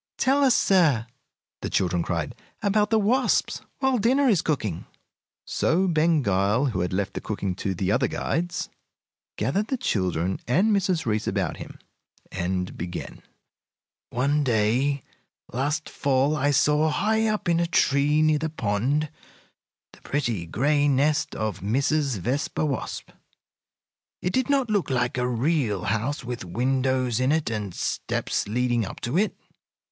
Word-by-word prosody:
"Tell 275 Hz, +2 st, +3 dB
us, 260 Hz, -3 st, +5 dB
sir," 155 Hz, -, +3 dB, 0.6 s
the -, -, -3 dB
children 90 Hz, -2 st, +1 dB
cried, 85 Hz, -3 st, -2 dB, 0.3 s
"about 210 Hz, +1 st, +2 dB
the 225 Hz, -, +3 dB
wasps 240 Hz, +5 st, +1 dB, 0.2 s
while 265 Hz, -2 st, +1 dB
dinner 265 Hz, +6 st, +3 dB
is 200 Hz, -9 st, +4 dB
cooking." 110 Hz, -, -2 dB, 0.6 s
So 185 Hz, +4 st, +1 dB
Ben 160 Hz, -2 st, +2 dB
Gile, 100 Hz, +6 st, +2 dB
who 95 Hz, -, -2 dB
had 90 Hz, 0 st, -1 dB
left 95 Hz, +1 st, -1 dB
the -, -, -4 dB
cooking 100 Hz, -3 st, -3 dB
to 95 Hz, -1 st, -2 dB
the 95 Hz, +2 st, -1 dB
other -, -, +2 dB
guides, 175 Hz, 0 st, -2 dB, 0.7 s
gathered 200 Hz, +11 st, 0 dB
the 265 Hz, -, -1 dB
children 95 Hz, -, -1 dB
and 185 Hz, -, +3 dB
Mrs. 185 Hz, -4 st, 0 dB
Reece 110 Hz, -2 st, -1 dB
about -, -, -1 dB
him, -, -, -9 dB, 0.5 s
and 90 Hz, 0 st, -2 dB
began: 85 Hz, +1 st, -6 dB, 0.9 s
"One 140 Hz, +4 st, +1 dB
day 125 Hz, +4 st, +1 dB, 0.5 s
last 145 Hz, +5 st, -1 dB
fall 140 Hz, +2 st, +1 dB
I 145 Hz, -1 st, +1 dB
saw, 150 Hz, +2 st, +3 dB
high 220 Hz, +7 st, +1 dB
up 215 Hz, -3 st, -1 dB
in 170 Hz, -1 st, +3 dB
a 170 Hz, -, +1 dB
tree 150 Hz, -1 st, +3 dB
near 155 Hz, -1 st, +3 dB
the 160 Hz, +1 st, -2 dB
pond, 135 Hz, +3 st, 0 dB, 0.9 s
the -, -, -18 dB
pretty, 120 Hz, -, -2 dB
gray 145 Hz, -, +2 dB
nest 145 Hz, +3 st, +1 dB
of 110 Hz, -4 st, -3 dB
Mrs. 135 Hz, +5 st, 0 dB
Vespa 130 Hz, -, -1 dB
Wasp. 140 Hz, -5 st, -4 dB, 1.1 s
It 180 Hz, -, -2 dB
did 260 Hz, 0 st, +1 dB
not 270 Hz, -5 st, +2 dB
look 205 Hz, -7 st, +1 dB
like 125 Hz, 0 st, 0 dB
a 125 Hz, -, +1 dB
real 125 Hz, -, 0 dB
house, 130 Hz, +7 st, -1 dB
with 120 Hz, -2 st, -5 dB
windows 130 Hz, +4 st, 0 dB
in 130 Hz, +2 st, +2 dB
it 155 Hz, -6 st, 0 dB
and 105 Hz, -5 st, -4 dB
steps -, -, -2 dB
leading 120 Hz, +1 st, +1 dB
up 95 Hz, -, -7 dB
to 120 Hz, +5 st, -3 dB
it. 205 Hz, +4 st, +1 dB
140 Hz, 150 wpm, -25 LUFS, 110-165 Hz, 1.1 s, us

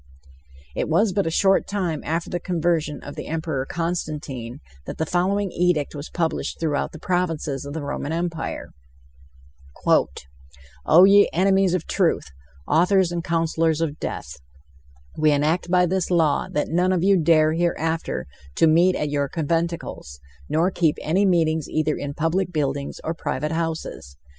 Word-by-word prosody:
It -, -, -2 dB
was 190 Hz, +5 st, +2 dB
but 200 Hz, -2 st, 0 dB
a -, -, +2 dB
short 195 Hz, +3 st, +2 dB
time 180 Hz, -7 st, -2 dB
after 165 Hz, +2 st, -2 dB
the 175 Hz, -, -3 dB
conversion 165 Hz, -3 st, -1 dB
of 145 Hz, -, -8 dB
the -, -, -7 dB
Emperor 155 Hz, -4 st, -3 dB
Constantine, 150 Hz, -7 st, -4 dB, 0.3 s
that -, -, -6 dB
the 160 Hz, -, -1 dB
following 190 Hz, +4 st, 0 dB
edict 175 Hz, -4 st, 0 dB
was 145 Hz, 0 st, -7 dB
published 165 Hz, -2 st, -2 dB
throughout 155 Hz, -3 st, -1 dB
the -, -, -10 dB
provinces 160 Hz, -6 st, -2 dB
of 140 Hz, -, -6 dB
the 160 Hz, -1 st, -4 dB
Roman 145 Hz, +1 st, -4 dB
Empire: 165 Hz, -1 st, -3 dB, 2.2 s
"O 175 Hz, +4 st, +7 dB
ye 200 Hz, +1 st, +6 dB
enemies 190 Hz, +1 st, +3 dB
of 175 Hz, -, -3 dB
truth, 165 Hz, -, 0 dB, 0.4 s
authors 180 Hz, +2 st, +3 dB
and 170 Hz, -1 st, -3 dB
counsellors 165 Hz, -2 st, 0 dB
of 155 Hz, -2 st, -2 dB
death 70 Hz, -, -5 dB, 0.8 s
we 155 Hz, 0 st, +4 dB
enact 155 Hz, +5 st, +1 dB
by 180 Hz, 0 st, +4 dB
this 185 Hz, +1 st, -1 dB
law 165 Hz, -5 st, +2 dB
that 150 Hz, -, -1 dB
none 180 Hz, +3 st, +2 dB
of 180 Hz, -2 st, +1 dB
you 195 Hz, +1 st, +5 dB
dare 155 Hz, -2 st, +4 dB
hereafter 165 Hz, -, -1 dB, 0.3 s
to -, -, +4 dB
meet 170 Hz, +3 st, +4 dB
at 150 Hz, -1 st, -2 dB
your 145 Hz, -1 st, 0 dB
conventicles...nor 155 Hz, -, -3 dB
keep 165 Hz, -4 st, +1 dB
any 190 Hz, +6 st, +2 dB
meetings 160 Hz, -3 st, +1 dB
either 155 Hz, -1 st, 0 dB
in 145 Hz, 0 st, -5 dB
public 180 Hz, +4 st, 0 dB
buildings 140 Hz, -3 st, -2 dB
or 160 Hz, -, -2 dB
private 150 Hz, -1 st, -3 dB
houses. 160 Hz, -, -4 dB
165 Hz, 155 wpm, -23 LUFS, 150-180 Hz, 2.2 s, O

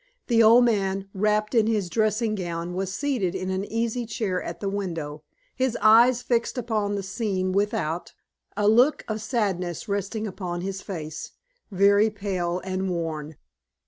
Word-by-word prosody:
The 230 Hz, -2 st, +3 dB
old 230 Hz, +2 st, +7 dB
man, 195 Hz, -4 st, 0 dB
wrapped 210 Hz, +2 st, +1 dB
in 225 Hz, -3 st, +4 dB
his 210 Hz, -4 st, 0 dB
dressing 215 Hz, +3 st, +1 dB
gown, 175 Hz, -3 st, -4 dB
was 190 Hz, +1 st, -2 dB
seated 215 Hz, -7 st, -1 dB
in 185 Hz, 0 st, -3 dB
an 190 Hz, +1 st, -1 dB
easy 230 Hz, +2 st, -2 dB
chair 215 Hz, -5 st, -2 dB
at 170 Hz, 0 st, -6 dB
the 200 Hz, -, -3 dB
window, 165 Hz, -7 st, -4 dB, 0.3 s
his 255 Hz, -2 st, 0 dB
eyes 235 Hz, +3 st, +6 dB
fixed 240 Hz, 0 st, 0 dB
upon 215 Hz, -4 st, -1 dB
the 200 Hz, -, -3 dB
scene 190 Hz, -2 st, -2 dB
without, 190 Hz, -4 st, -1 dB, 0.5 s
a 205 Hz, 0 st, +2 dB
look 245 Hz, +7 st, +4 dB
of 215 Hz, -1 st, -3 dB
sadness 195 Hz, -, -2 dB
resting 205 Hz, +2 st, -2 dB
upon 180 Hz, -3 st, -4 dB
his 190 Hz, +1 st, -4 dB
face 160 Hz, -5 st, -6 dB, 0.4 s
very 200 Hz, +2 st, +4 dB
pale 185 Hz, -4 st, -2 dB
and 190 Hz, 0 st, -2 dB
worn. 160 Hz, -3 st, -3 dB
200 Hz, 155 wpm, -25 LUFS, 185-220 Hz, 0.5 s, old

